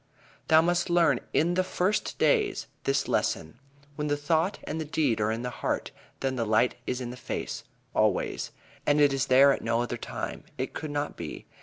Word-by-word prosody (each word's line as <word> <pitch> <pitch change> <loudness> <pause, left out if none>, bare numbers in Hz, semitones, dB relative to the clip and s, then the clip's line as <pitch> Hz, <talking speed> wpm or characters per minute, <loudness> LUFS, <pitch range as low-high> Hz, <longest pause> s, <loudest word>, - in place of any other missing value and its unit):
"Thou 160 0 +6
must 175 +1 +1
learn 175 -2 +4
in 170 +3 +2
the 185 +1 +2
first 185 +2 -1
days 425 -5 +2 0.2
this 135 0 +1
lesson: 80 +9 -1 0.4
When 150 0 -2
the 145 0 +1
thought 160 +6 +1
and 160 +2 -3
the - - -3
deed 145 -7 +1
are 105 - +2
in 115 +2 -3
the 125 - -3
heart, - - -2 0.3
then 130 -1 -1
the 115 - +1
light 110 +3 +3
is 125 - -1
in 120 -1 -4
the - - -7
face, 125 - -4 0.3
always, - - +1 0.4
and 145 0 +4
it 145 -2 +5
is 135 0 0
there 135 +2 +7
at - - -1
no 115 0 +1
other 120 0 -3
time. - - -5
It 130 0 -3
could 155 - -5
not 145 0 -3
be. 80 -3 -6
145 Hz, 200 wpm, -28 LUFS, 125-160 Hz, 0.4 s, there